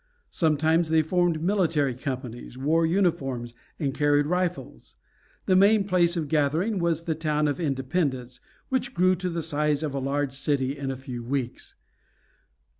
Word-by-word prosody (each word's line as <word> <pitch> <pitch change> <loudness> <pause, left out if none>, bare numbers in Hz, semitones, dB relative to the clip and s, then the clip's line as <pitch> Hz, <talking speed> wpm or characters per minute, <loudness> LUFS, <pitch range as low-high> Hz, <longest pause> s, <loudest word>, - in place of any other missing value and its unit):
Sometimes 160 +1 +2
they 160 0 +3
formed 170 -1 +1
military 165 -8 +1
companies, 125 -2 -6
wore 160 +5 +2
uniforms, 135 -10 0 0.3
and 140 -4 -1
carried 145 0 +2
rifles. 180 +2 -3 0.5
The 185 - +3
main 200 +2 +5
place 180 -3 +2
of 155 -3 -2
gathering 160 +8 +1
was 165 -2 0
the 165 -2 -1
town 150 -1 0
of 145 +3 -2
Independence, 135 -4 -2 0.3
which 260 -1 -1
grew 185 +1 +4
to 185 0 -2
the 170 -1 -3
size 150 -1 0
of 150 -3 -2
a 140 - -2
large 140 0 -1
city 140 -1 -1
in 140 -2 -4
a 135 - -3
few 125 -2 -7
weeks. 125 0 -4
150 Hz, 155 wpm, -26 LUFS, 135-170 Hz, 0.5 s, main